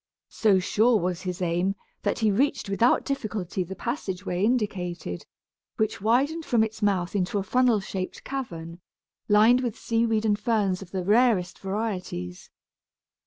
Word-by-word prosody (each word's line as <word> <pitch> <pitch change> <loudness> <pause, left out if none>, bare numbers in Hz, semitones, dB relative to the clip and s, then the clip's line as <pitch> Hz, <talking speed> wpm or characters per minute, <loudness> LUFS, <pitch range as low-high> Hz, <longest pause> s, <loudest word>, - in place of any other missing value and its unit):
So 210 -4 +3
sure 215 +5 +3
was 180 0 -2
his 180 0 -4
aim, 175 +3 0 0.3
that - - 0
he 220 -2 +2
reached 270 +4 +1
without 230 +5 +3
difficulty 210 -9 -3
the 190 +2 -7
passage 200 - -4
way 180 +1 -1
indicated, 180 - -2 0.5
which 220 -2 -1
widened 275 +10 +2
from 235 -6 +2
its 220 0 -5
mouth 195 -3 0
into 190 +1 0
a 200 - 0
funnel 250 0 +3
shaped 190 -1 -5
cavern, 170 -11 -6 0.5
lined 220 +4 +6
with 240 -4 -3
seaweed 225 -1 0
and 210 -1 +2
ferns 210 -5 0
of 190 - -10
the 185 -1 -3
rarest 205 -3 +2
varieties. 190 - -4
205 Hz, 150 wpm, -26 LUFS, 185-230 Hz, 0.5 s, lined